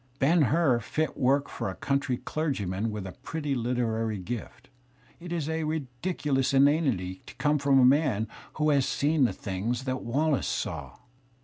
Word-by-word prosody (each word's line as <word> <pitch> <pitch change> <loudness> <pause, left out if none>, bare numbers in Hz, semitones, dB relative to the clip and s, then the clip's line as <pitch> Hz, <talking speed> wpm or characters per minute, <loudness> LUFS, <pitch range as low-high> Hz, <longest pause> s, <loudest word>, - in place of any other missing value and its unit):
"Ben 160 +6 +4
Hur," 145 -2 +3
fit 155 +7 -2
work 140 +2 +2
for - - -4
a - - -6
countiy 140 -2 0
clergyman 115 - -1
with 105 -2 -5
a 95 - -6
pretty 150 -3 -3
literary 115 -3 -1
gift, 110 +5 -7 0.5
is 170 -3 -3
a 160 0 -1
ridiculous 140 -1 -1
inanity 135 - +2
to - - -11
come 150 0 +1
from 140 -1 +4
a 125 - +6
man 130 -5 +3 0.3
who 155 0 +2
has 140 -3 +3
seen 145 -1 +2
the - - +1
things 110 +6 -3
that 130 -1 -2
Wallace 140 +4 0
saw! - - -4
135 Hz, 155 wpm, -28 LUFS, 120-150 Hz, 0.5 s, a